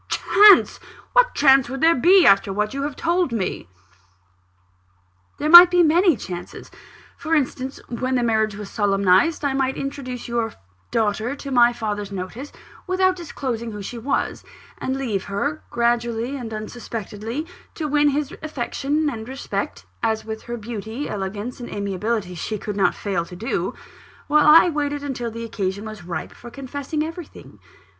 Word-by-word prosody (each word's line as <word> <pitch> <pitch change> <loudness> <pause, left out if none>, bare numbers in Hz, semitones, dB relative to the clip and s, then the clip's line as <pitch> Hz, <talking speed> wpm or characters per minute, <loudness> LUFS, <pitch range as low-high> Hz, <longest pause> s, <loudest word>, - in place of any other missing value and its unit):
Chance! 410 -1 +5 0.3
what - - +4
chance 270 -3 +5
would 270 +1 -5
there 325 +1 +6
be, 355 +7 +5
after 195 0 +5
what 210 +3 -1
you 275 - -3
have 285 -1 -3
told 345 -3 0
me?" 190 - -3 1.7
"There 300 - -2
might 345 +2 +11
be 355 -1 +4
many 335 - +4
chances. 180 -3 -8 0.5
For 325 0 -1
instance, 265 -2 -2
when 255 +2 -2
the 245 - +1
marriage 220 -2 +1
was 205 -1 -8
solemnised, 200 - +2
I 280 - +1
might 265 -1 -1
introduce 275 -3 -5
your 235 -2 -2 0.4
daughter 220 +3 -1
to 280 -1 -8
my 240 -2 +5
father's 210 -4 -4
notice 200 +9 -6 0.4
without 370 0 +2
disclosing 250 -9 -5
who 205 -1 -7
she 235 +4 -6
was 265 +5 -2 0.4
and 260 +1 -2
leave 220 -8 -2
her, 285 +10 -3
gradually 235 +1 0
and 240 -5 -6
unsuspectedly, 220 +3 -6 0.3
to 315 - -3
win 295 0 +3
his 285 0 -2
affection 300 +1 -2
and 230 -4 -5
respect 270 +1 -5 0.2
(as 220 -1 -1
with 220 0 -6
her 240 - -3
beauty, 225 +4 -6
elegance, 205 +5 -5
and 240 - -7
amiability, 200 0 -3
she 210 +5 -4
could 210 0 -5
not 200 - +2
fail 195 -4 -2
to 180 +1 -11
do), 220 +6 -3 0.5
while 300 0 +3
I 320 +4 +8
waited 290 -1 -2
until 250 -4 -4
the 230 +1 -6
occasion 200 -2 -3
was 215 -4 -8
ripe 175 -1 -5
for 240 - -12
confessing 285 +4 -4
everything. 330 0 -9
240 Hz, 160 wpm, -22 LUFS, 215-290 Hz, 1.7 s, might